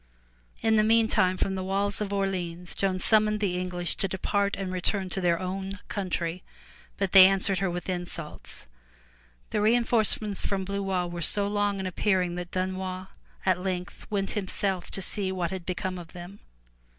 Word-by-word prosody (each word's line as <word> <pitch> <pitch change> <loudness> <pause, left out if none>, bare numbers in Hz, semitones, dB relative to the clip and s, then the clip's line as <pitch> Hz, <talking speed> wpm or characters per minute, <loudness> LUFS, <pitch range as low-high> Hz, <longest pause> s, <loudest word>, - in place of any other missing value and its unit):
In 220 -1 +4
the 215 - +5
meantime 220 -4 +3
from 195 - 0
the 190 -1 -3
walls 200 +2 0
of 205 -1 -2
Orleans, 180 -3 -2
Joan 190 -1 0
summoned 215 +2 +3
the 195 -4 0
English 180 -1 -2
to 195 - 0
depart 200 +2 0
and 195 -2 -3
return 185 +1 -1
to 190 - -1
their 170 -2 +2
own 190 +1 -4
country, 180 -3 -2 0.6
but 195 -2 -1
they 190 -1 +10
answered 195 -1 +2
her 195 0 +1
with 175 0 -4
insults. 175 -4 -5 0.9
The - - +1
reinforcements 220 -2 +2
from 195 -1 -1
Blois 195 -2 -1
were 175 0 -5
so 200 +5 +4
long 205 -1 0
in 190 - -3
appearing 185 -1 +1
that 175 0 -5
Dunois 185 0 -3 0.4
at 185 -1 +2
length 185 0 -4
went 195 -2 -1
himself 190 -2 -2
to 195 - -2
see 195 -1 0
what 180 -2 -2
had 185 -2 -6
become 185 0 -3
of 170 -2 -11
them. 180 +3 -9
190 Hz, 170 wpm, -27 LUFS, 180-200 Hz, 0.9 s, they